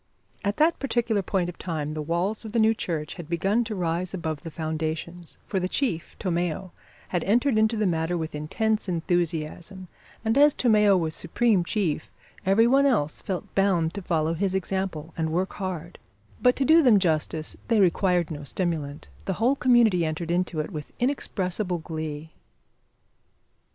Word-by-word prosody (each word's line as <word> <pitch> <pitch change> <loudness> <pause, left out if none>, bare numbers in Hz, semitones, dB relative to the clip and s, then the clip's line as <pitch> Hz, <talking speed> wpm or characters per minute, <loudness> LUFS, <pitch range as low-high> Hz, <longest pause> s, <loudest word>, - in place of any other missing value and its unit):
At 205 +1 -1
that 320 +3 +3
particular 240 -6 0
point 185 -1 -1
of 175 - -8
time 155 -4 -3
the 155 - -3
walls 175 +8 -1
of 220 -1 -8
the 235 - +2
new 220 0 +5
church 160 -7 -3
had 160 - -14
begun 195 +7 +1
to 220 -1 -4
rise 175 +1 -1
above 160 -4 -3
the 165 - -7
foundations, 160 +2 -4
for 195 - -1
the 185 0 -2
chief, 185 - -1
Tomeo, 175 0 -2 0.4
had 175 -3 -1
entered 240 +5 +3
into 220 +1 +3
the 215 - +1
matter 170 -1 0
with 160 -1 -4
intense 210 +8 -1
enthusiasm, 175 +1 -2 0.4
and 225 +5 +3
as 295 0 +6
Tomeo 210 -5 +4
was 160 -3 -1
supreme 195 +3 +1
chief, 170 -5 -1 0.4
every 205 +4 +5
one 275 +3 +4
else 155 - 0
felt 185 -3 -5
bound 185 -4 +2
to 200 - -5
follow 165 -3 0
his 190 +3 -1
example 190 -4 -3
and 160 -2 -1
work 185 +3 -1
hard; 180 -2 -5 0.4
but, 250 0 +5
to 275 - 0
do 320 +3 +7
them 245 -8 +6
justice, 160 -3 0
they 230 -3 +3
required 180 -2 +2
no 145 -2 -5
stimulant; 150 -1 -3 0.2
the 190 - -1
whole 235 +8 +2
community 240 -9 +4
entered 160 +1 -2
into 175 -2 0
it 155 - -6
with 150 -4 -7
inexpressible 195 -8 -1
glee. 160 -1 -6
180 Hz, 170 wpm, -26 LUFS, 160-215 Hz, 0.4 s, do